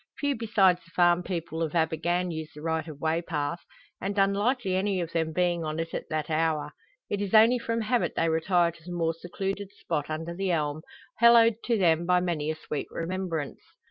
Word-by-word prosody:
Few 285 +1 0
besides 195 -6 +3
the 170 - -21
farm 175 0 +3
people 170 -3 -4
of 160 -2 -1
Abergann 170 +2 0
use 160 -1 -5
the 150 - -10
right 160 -1 -1
of 150 -3 -9
way 160 +2 0
path, 160 -1 -3 0.4
and 200 +1 -3
unlikely 200 +1 +1
any 190 0 0
of 170 -2 -3
them 160 -1 -1
being 175 0 0
on 155 0 -3
it 165 0 -4
at - - -5
that 155 -1 -2
hour. 155 -1 0 0.4
It 205 - -2
is 205 +1 0
only 230 +3 +6
from 230 0 -2
habit 240 +2 0
they 165 - +1
retire 170 +2 +2
to 165 -1 -19
the 180 - -8
more 165 -1 0
secluded 195 +4 -4
spot 145 0 -3
under 160 +2 -4
the 190 +2 -2
elm, 155 -3 -1 0.4
hallowed 235 -1 +6
to 235 -2 +2
them 170 -3 +2
by 180 0 +4
many 170 -4 -1
a 160 - -1
sweet 155 -2 -5
remembrance. 170 -4 -4
175 Hz, 205 wpm, -27 LUFS, 160-195 Hz, 0.4 s, only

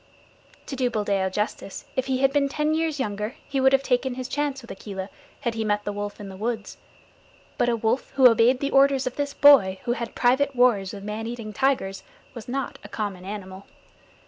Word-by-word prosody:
To 275 - -6
do 255 -2 +1
Buldeo 200 -4 0
justice, 210 0 -4
if 260 0 -1
he 260 -1 0
had 270 0 +3
been 280 -1 +2
ten 300 +2 0
years 315 -2 -1
younger 210 0 -3
he 270 -1 -1
would 265 0 +5
have 270 0 +3
taken 250 -1 0
his 255 0 -5
chance 285 0 -2
with 235 -2 -11
Akela 195 -1 -7 0.3
had 235 -4 -1
he 225 0 -2
met 210 -1 0
the 205 - -3
wolf 205 0 -5
in 205 - -7
the 190 - -9
woods, 220 +1 -4 0.8
but 245 -1 +3
a 235 - +2
wolf 225 +3 -1
who 265 -2 +8
obeyed 240 +2 +4
the 280 - -1
orders 275 -1 +4
of 255 - -3
this 285 -1 -3
boy 230 -10 +6
who 240 - -1
had 235 -1 -4
private 265 +3 +2
wars 235 -6 +3
with 200 -1 -9
man 215 +2 -4
eating 230 -3 -6
tigers 225 -6 0 0.3
was 235 -4 -9
not 265 +1 -4
a - - -10
common 200 -4 -4
animal. 195 -1 -8
240 Hz, 210 wpm, -25 LUFS, 205-270 Hz, 0.8 s, who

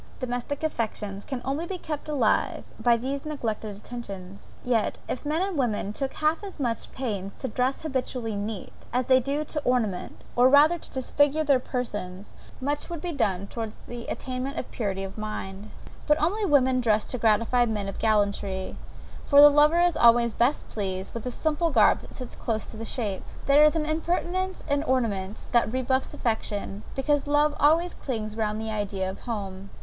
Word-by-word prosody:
Domestic 255 +3 -3
affection 215 -8 -2
can 245 +2 -5
only 285 +6 -2
be 380 - -3
kept 305 -3 -5
alive 260 -8 +1 0.2
by 235 +1 +4
these 270 +4 -3
neglected 220 -8 -4
attentions; 200 -5 -9
yet 235 -3 +1
if - - -4
men 315 +4 +1
and 385 -2 -2
women 220 -6 0
took 270 +3 -2
half 310 +4 +1
as 390 -5 -8
much 235 -5 -2
pains 205 -7 -4
to 265 - -4
dress 255 +5 -1
habitually 250 -6 -2
neat, 205 0 -4 0.2
as 250 0 +1
they 260 +1 +5
do 280 +4 -1
to 300 - -3
ornament, 235 -8 -1 0.2
or 245 +1 +6
rather 300 +5 +6
to - - -11
disfigure 290 +3 +1
their 280 -3 +4
persons, 205 -7 -5 0.3
much 290 +5 -2
would 340 -2 -4
be 350 +3 -3
done 200 - 0
towards 225 0 -6
the 240 -1 -7
attainment 260 +3 -4
of - - -5
purity 195 -4 -2
of 195 +2 -7
mind. 210 -1 -5 0.4
But 300 0 +5
women 350 -8 +3
only 255 -1 +2
dress 215 -3 +2
to 250 - -2
gratify 230 +2 +3
men 210 -3 -2
of 195 - -6
gallantry; 200 -3 0 0.5
for 280 - +6
the 295 0 +11
lover 300 +4 +5
is 350 -2 +3
always 235 -1 +5
best 250 +5 +1
pleased 190 -3 -3
with 230 0 -6
the - - -1
simple 315 +6 0
garb 230 -8 +5
that - - -12
sits 255 - -7
close 220 -2 -3
to 220 - -10
the 225 - -5
shape. 215 -6 -2 0.2
There 285 +2 +6
is 305 +1 +5
an 310 -2 0
impertinence 350 +4 -1
in 285 -1 +1
ornaments 220 -8 -1
that 235 -2 +3
rebuffs 260 +1 0
affection; 210 -3 -2
because 290 +1 +1
love 295 +1 +3
always 330 +4 +4
clings 215 -5 -4
round 215 -1 -1
the 220 0 -3
idea 200 -3 -2
of 190 +1 -5
home. 200 -4 -5
245 Hz, 185 wpm, -26 LUFS, 215-290 Hz, 0.5 s, the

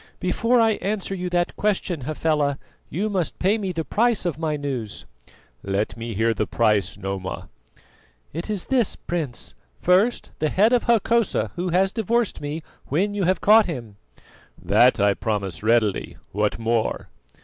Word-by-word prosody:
"Before 230 +7 +2
I 225 -1 +4
answer 200 -1 -2
you 180 -1 -3
that 175 0 0
question, 190 -6 -1
Hafela, 150 -2 0 0.3
you 195 +7 -1
must 190 -6 -2
pay 200 +4 +2
me 195 -3 -2
the 165 -2 -3
price 230 -2 +1
of 170 -3 -2
my 155 -2 -1
news." 130 -7 -5 0.6
"Let 100 +2 -2
me 115 -1 -6
hear 115 +2 +2
the 105 0 -2
price, 105 -4 +1
Noma." 95 -1 -5 0.8
"It 165 +7 -5
is 205 -4 -2
this, 250 -6 +1
Prince: 150 - -5 0.3
First, 195 +7 +2
the 155 - +1
head 215 +9 +3
of 245 - +2
Hokosa, 230 - +2
who 180 +1 -2
has 185 +3 +2
divorced 230 +1 0
me, 150 +2 -4 0.2
when 195 +9 0
you 200 -3 0
have 185 0 +1
caught 215 +1 +6
him." 115 - -6 0.6
"That - - +4
I 100 0 +4
promise 100 -6 -3
readily. 110 -2 +1
What 105 +1 0
more?" 115 0 -1
165 Hz, 160 wpm, -23 LUFS, -, 0.8 s, caught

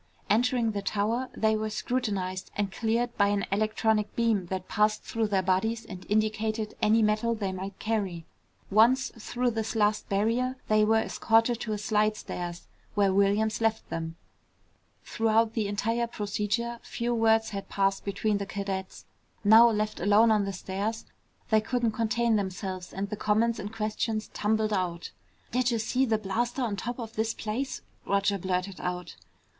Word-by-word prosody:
Entering 235 +1 +2
the 205 -1 -3
tower, 220 +6 -1
they 220 0 +3
were 215 0 -2
scrutinized 205 -5 -2
and 200 -1 -1
cleared 235 +3 -1
by 200 - +4
an 205 0 0
electronic 215 +1 +1
beam 225 -6 +1
that 185 0 -4
passed 210 0 +1
through 225 -1 -1
their 195 -2 +1
bodies 220 +5 0
and 185 -2 -9
indicated 215 +1 0
any 220 +1 +4
metal 215 +2 +1
they 200 -3 -2
might 190 +1 -6
carry. 195 -7 -2 0.5
Once 240 +6 +4
through 245 +2 -1
this 225 0 -3
last 210 -1 +1
barrier, 230 +6 +1
they 215 0 +4
were 220 +1 +4
escorted 225 +1 +2
to 230 - -4
a - - -2
slidestairs, 210 -5 -1 0.3
where 200 -2 +3
Williams 205 +3 +2
left 225 -1 0
them. 165 0 -4 0.9
Throughout 225 0 +2
the 220 -3 0
entire 225 +4 0
procedure 215 +2 -2
few 240 +1 -2
words 225 -1 +3
had 200 -1 -6
passed 195 0 +1
between 200 +1 0
the 200 - -4
cadets. 195 -1 -5 0.4
Now 220 +3 +8
left 215 -1 -1
alone 210 +5 +5
on 210 -2 +3
the 195 - -3
stairs, 200 +5 -3 0.5
they 215 0 +5
couldn't 240 0 0
contain 230 0 +1
themselves 190 -2 -4
and 195 +1 -4
the - - -1
comments 220 +3 +1
and 205 0 -5
questions 215 0 -2
tumbled 215 0 +1
out. 175 -3 -2 0.4
"Did'ja 245 -1 +1
see 255 +4 +1
that 220 -3 0
blaster 240 +6 -1
on 220 -4 -1
top 235 +5 -4
of 230 -2 -7
this 220 +1 -1
place?" 235 +6 -3 0.3
Roger 200 0 +1
blurted 185 +1 -2
out. 180 0 -4
215 Hz, 160 wpm, -28 LUFS, 200-225 Hz, 0.9 s, Now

